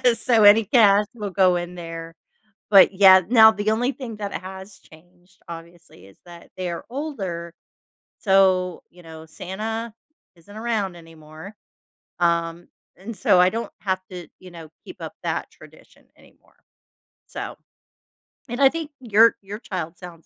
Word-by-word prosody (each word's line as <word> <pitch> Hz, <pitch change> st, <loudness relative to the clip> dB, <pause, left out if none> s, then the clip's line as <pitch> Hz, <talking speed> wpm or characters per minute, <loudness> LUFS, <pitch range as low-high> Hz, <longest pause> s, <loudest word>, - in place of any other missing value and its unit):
So, 230 Hz, -1 st, +2 dB
any 205 Hz, +2 st, +7 dB
cash 205 Hz, -2 st, +4 dB
will 210 Hz, -3 st, -5 dB
go 185 Hz, -1 st, +3 dB
in 175 Hz, 0 st, -5 dB
there. 165 Hz, -1 st, -8 dB, 0.6 s
But 195 Hz, -1 st, +7 dB
yeah, 190 Hz, -1 st, +7 dB
now 220 Hz, -2 st, +7 dB
the 215 Hz, 0 st, -2 dB
only 245 Hz, +5 st, 0 dB
thing 240 Hz, -6 st, -8 dB
that 205 Hz, -1 st, -6 dB
has 190 Hz, +1 st, -10 dB
changed, 175 Hz, +3 st, -22 dB
obviously, 170 Hz, -, -12 dB
is 100 Hz, -, -20 dB
that 170 Hz, -1 st, -14 dB
they're 175 Hz, -2 st, -5 dB
older. 195 Hz, -, -5 dB, 0.7 s
So, 190 Hz, -3 st, +2 dB
you 175 Hz, 0 st, -19 dB
know, 160 Hz, -1 st, -12 dB
Santa 215 Hz, +7 st, -6 dB, 0.4 s
isn't 185 Hz, +5 st, -17 dB
around 215 Hz, -5 st, -3 dB
anymore, 165 Hz, +3 st, -13 dB, 0.6 s
um, 170 Hz, 0 st, -1 dB, 0.3 s
and 215 Hz, +5 st, -9 dB
so 180 Hz, -, +3 dB
I 180 Hz, -, +5 dB
don't 230 Hz, +3 st, -5 dB
have 190 Hz, -1 st, -2 dB
to, 180 Hz, -2 st, -9 dB
you 185 Hz, -1 st, -14 dB
know, 165 Hz, -2 st, -12 dB, 0.2 s
keep 365 Hz, -, -11 dB
up -, -, -7 dB
that -, -, -3 dB
tradition -, -, -19 dB
anymore, -, -, -25 dB, 0.7 s
so -, -, -7 dB, 0.9 s
and 240 Hz, +3 st, -5 dB
I 270 Hz, -, +7 dB
think 325 Hz, 0 st, -6 dB
your 225 Hz, -1 st, +4 dB
your 205 Hz, +3 st, -8 dB
child 175 Hz, -6 st, -6 dB
sounds 175 Hz, -3 st, -12 dB
190 Hz, 150 wpm, -22 LUFS, 170-215 Hz, 0.9 s, any